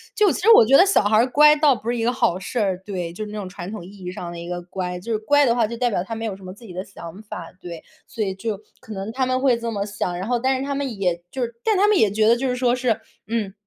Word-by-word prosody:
就 415 -5 +4
其 - - -3
实 450 +4 +6
我 335 - +9
觉 270 +4 +6
得 370 - +7
小 390 - +3
孩 215 +1 +3
儿 240 +3 +4
乖 300 +3 +6
倒 295 -3 +4
不 230 0 -6
是 245 - 0
一 225 - -1
个 240 - +2
好 175 - +1
事 240 +5 -4
儿， 190 -3 0
对， 180 -5 -4
就 215 +4 -5
是 210 - -9
那 215 - -6
种 190 -3 -5
传 180 +1 -8
统 215 -6 -7
意 - - -11 0.2
义 180 - -4
上 175 -1 -7
的 170 - -8
一 170 - -8
个 175 0 -4
乖。 180 0 -5
就 230 +6 -6
是 220 - +1
乖 290 +6 +3
的 235 - +3
话， 230 -2 +2
就 235 - -6
代 245 0 +1
表 180 -4 -1
他 225 - -7
没 225 - -5
有 205 -4 -3
什 195 - -16
么 185 0 -8
自 230 - -17
己 185 - -10
的 185 +1 -4
想 185 +1 -10
法， 175 -5 -8
对。 170 -3 -9 0.2
所 225 -2 -3
以 190 -1 -3
就 210 0 -4 0.2
可 220 - -10
能 195 +3 -5
他 260 +2 0
们 255 0 0
会 255 -4 +3
这 230 0 -4
么 200 -2 -2
想。 180 -3 -3
然 190 - -4
后， 245 -1 +1
但 265 +2 +1
是 265 - -3
他 280 0 -3
们 270 -6 -3
也 175 -2 -1
就 260 - -4
是 235 0 -5
但 435 - +2
他 410 +2 +4
们 425 - +4
也 210 - +3
觉 215 +1 +2
得 235 - +6
就 265 +2 -2
是 250 - 0
说 245 -1 +2
是， 240 -3 0 0.3
嗯， 215 -4 -2
220 Hz, 360 characters per minute, -22 LUFS, 190-250 Hz, 0.3 s, 我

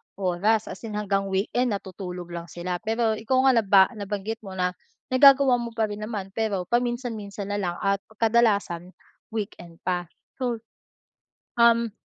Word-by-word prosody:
oras, 200 +4 +1
as - - -8
in 210 - -6
hanggang 200 -1 0
weekend 205 +4 0
natutulog 180 -3 -7
lang 170 0 -6
sila 175 +1 -4
pero 225 +2 0
ikaw 230 +4 +1
nga 265 - +6
naba 200 -2 +6
nabanggit 210 0 -4
mo 195 -4 -9
na 180 -1 +1 0.4
nagagawa 270 -1 +6
mo 235 -1 -6
pa 225 - +1
rin 205 - -5
naman 210 -3 -5
pero 205 -3 -1
paminsan-minsan 235 -5 -2
nalang 190 -4 -1
at 200 0 +2 0.2
kadalasan 205 -6 +1 0.4
weekend 185 -6 -5
pa. 180 -1 -1 0.3
So, 240 -3 -2 1.0
um, 235 -2 +4
210 Hz, 145 wpm, -25 LUFS, 190-230 Hz, 1.0 s, nga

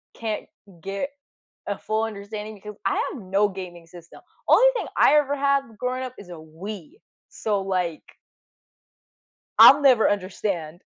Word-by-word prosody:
can't 220 -2 -4 0.4
get 195 +8 -4 0.6
a 200 - -2
full 220 +1 -2
understanding, 210 0 -7
because 210 +1 -10
I 195 - +1 0.2
have 230 - -9
no 200 +2 +1
gaming 175 -3 -9
system; 170 -1 -14 0.3
only - - +6
thing 420 -8 -2
I 295 - +6
ever 285 -1 +2
had 280 0 +2 0.2
growing 255 +1 -2
up 255 -1 -6
is 190 -3 -12
a - - -7
Wii. 175 - -9 0.4
So, 205 -3 -2
like 180 -4 -2 1.6
I'll 290 +1 +10
never 255 -5 +5
understand. 185 -4 -3
205 Hz, 145 wpm, -24 LUFS, 185-250 Hz, 1.6 s, I'll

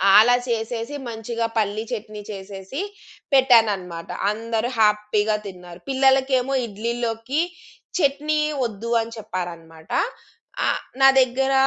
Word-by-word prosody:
ఆలా 235 +4 +8
చేసేసి 230 +3 -2
మంచిగా 230 +1 -3
పల్లి 215 0 0
చట్నీ 215 -2 -5
చేసేసి 195 - -6 0.5
పెట్టానన్నమాట. 210 -10 +3 0.2
అందరూ 225 +2 -2
హ్యాపీగా 210 0 +3
తిన్నారు. 180 -2 -10
పిల్లలకేమో 265 0 +3
ఇడ్లీలోకి 235 +5 -2 0.6
చట్నీ 300 0 +1 0.3
వద్దు 230 +1 -5
అని 225 0 -6
చెప్పారన్నమాట. 170 -5 -7 0.8
ఆహ్, - - 0 0.2
నా 270 - +9
దగ్గర 265 +2 +1
225 Hz, 100 wpm, -23 LUFS, 205-250 Hz, 0.8 s, నా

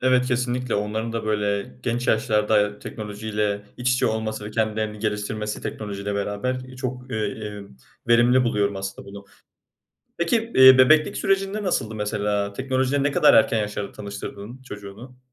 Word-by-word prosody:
Evet, 130 0 +3
kesinlikle! 125 0 -1
Onların 110 +2 -2
da, 115 -1 -3
böyle, 105 +1 -1
genç 120 +1 -2
yaşlarda 105 -1 +2
teknolojiyle 105 -1 -3
iç 125 +1 +1
içe 125 - +2
olması 110 -1 -2
ve 105 - -6
kendilerini 110 -1 -1
geliştirmesi 105 0 -3
teknolojiyle 100 -1 -4
beraber, 105 +5 -2
iii, 130 0 -12
çok, 130 0 -5
iii, 110 -2 -2
iii, 105 -2 -7 0.4
verimli 120 +2 +5
buluyorum 100 -4 0
aslında 95 0 -6
bunu. 100 0 -10 0.9
Peki, 225 +7 0
iii, 130 0 +9
bebeklik 155 +4 +5
sürecinde 195 +2 0
nasıldı 110 - -1
mesela? 105 -1 -1
Teknolojiyle 130 +3 0
ne 145 - +1
kadar - - +5
erken 110 0 +4
yaşlarda 105 -1 -3
tanıştırdın 100 +4 -8
çocuğunu? 110 +2 -10
110 Hz, 145 wpm, -23 LUFS, 105-125 Hz, 0.9 s, iii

